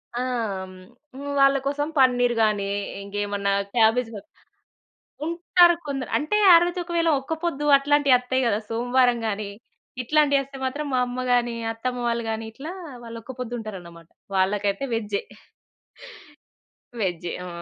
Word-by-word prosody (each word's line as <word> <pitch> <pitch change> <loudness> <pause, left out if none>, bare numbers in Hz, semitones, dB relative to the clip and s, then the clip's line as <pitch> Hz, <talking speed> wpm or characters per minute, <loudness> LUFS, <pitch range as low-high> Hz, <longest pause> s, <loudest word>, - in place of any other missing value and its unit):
ఆ! - - -1 1.2
వాళ్ళ 275 0 +6
కోసం 290 +1 -1
పన్నీర్ 245 -2 +4
గాని, 205 -2 +1 0.3
ఇంకేమన్నా 200 0 -2 0.2
క్యాబేజ్ 225 +1 +3 1.2
ఉంటారు 345 +1 +4
కొందరు. 270 -3 -4
అంటే 305 +8 -1 0.2
ఆ - - +10
రోజు 350 +1 -3
ఒకవేళ 335 -1 0
ఒక్కపొద్దు 320 0 -3
అట్లాంటి 290 0 +2
అత్తయి 260 +1 -1
కదా! 210 -2 +2
సోమవారం 245 +1 +2
గాని 205 0 -3 0.5
ఇట్లాంటివి 285 +1 +3
అస్తే 275 0 -11
మాత్రం 290 +3 -3
మా 255 - +2
అమ్మ 250 +1 -4
గాని, 240 -1 +1 0.2
అత్తమ్మ 245 +2 -4
వాళ్ళు 235 0 -1
గాని 220 0 -3
ఇట్లా 290 +8 -8 0.3
వాళ్ళు 230 -1 -8
ఒక్క 260 - -8
పొద్దుంటారన్నమాట 195 -9 -7 0.3
వాళ్ళకైతే 200 +4 +1
వెజ్జే. 210 -3 -2 1.8
వేజ్జే. 175 -3 -2
ఆ! - - -7
245 Hz, 125 wpm, -24 LUFS, 215-280 Hz, 1.8 s, ఆ